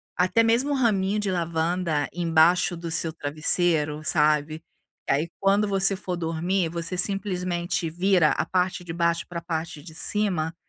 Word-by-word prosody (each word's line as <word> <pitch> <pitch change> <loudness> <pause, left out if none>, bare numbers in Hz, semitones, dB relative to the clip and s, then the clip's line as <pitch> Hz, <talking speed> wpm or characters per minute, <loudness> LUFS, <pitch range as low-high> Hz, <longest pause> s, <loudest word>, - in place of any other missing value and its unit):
até 185 +6 +2
mesmo 235 +6 +2
um - - +2
raminho 210 -6 +1
de 205 -1 -2
lavanda 170 -2 -1
embaixo 170 +1 +3
do 170 0 -6
seu 160 0 -1
travesseiro 155 0 +1
sabe, 150 0 +1 0.5
que - - -1
aí 155 +5 -1
quando 200 +2 +3
você 195 0 +2
for 180 -1 -4
dormir 170 +2 -1
você 170 +2 -4
simplesmente 180 -3 -2
vira 175 -1 +2
a 155 - -1
parte 180 +1 -1
de 170 -1 -7
baixo 170 0 0
pra 170 -1 -6
parte 160 -3 -5
de 160 0 -11
cima, 175 -3 -1
175 Hz, 155 wpm, -25 LUFS, 160-190 Hz, 0.5 s, embaixo